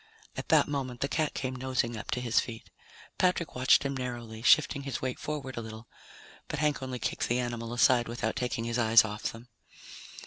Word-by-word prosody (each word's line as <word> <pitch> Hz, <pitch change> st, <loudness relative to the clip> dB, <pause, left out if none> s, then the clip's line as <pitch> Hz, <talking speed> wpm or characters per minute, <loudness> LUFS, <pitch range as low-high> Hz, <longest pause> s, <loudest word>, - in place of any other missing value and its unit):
At -, -, -6 dB
that -, -, +5 dB
moment 135 Hz, -4 st, -3 dB
the 140 Hz, -, +1 dB
cat 155 Hz, +1 st, -1 dB
came 130 Hz, -1 st, -3 dB
nosing 125 Hz, -2 st, -1 dB
up 105 Hz, -, -8 dB
to 125 Hz, -, -1 dB
his 120 Hz, -2 st, +2 dB
feet. 115 Hz, -2 st, -6 dB, 0.5 s
Patrick 180 Hz, -3 st, +1 dB
watched 130 Hz, +1 st, +4 dB
him 140 Hz, 0 st, -2 dB
narrowly, 120 Hz, -3 st, -5 dB
shifting 140 Hz, +2 st, +4 dB
his 135 Hz, -1 st, -4 dB
weight 130 Hz, -1 st, -3 dB
forward 140 Hz, -4 st, -5 dB
a -, -, -2 dB
little, 110 Hz, 0 st, -9 dB, 0.6 s
but 150 Hz, -, -4 dB
Hank 150 Hz, -1 st, +1 dB
only 130 Hz, -1 st, -4 dB
kicked 110 Hz, -, -2 dB
the 120 Hz, -, +2 dB
animal 120 Hz, -2 st, -3 dB
aside 120 Hz, 0 st, +4 dB
without 120 Hz, +1 st, -2 dB
taking 125 Hz, -2 st, -2 dB
his 115 Hz, +1 st, -1 dB
eyes 110 Hz, -1 st, +6 dB
off 105 Hz, 0 st, -3 dB
them. 115 Hz, +2 st, -12 dB
125 Hz, 200 wpm, -29 LUFS, 115-135 Hz, 0.6 s, eyes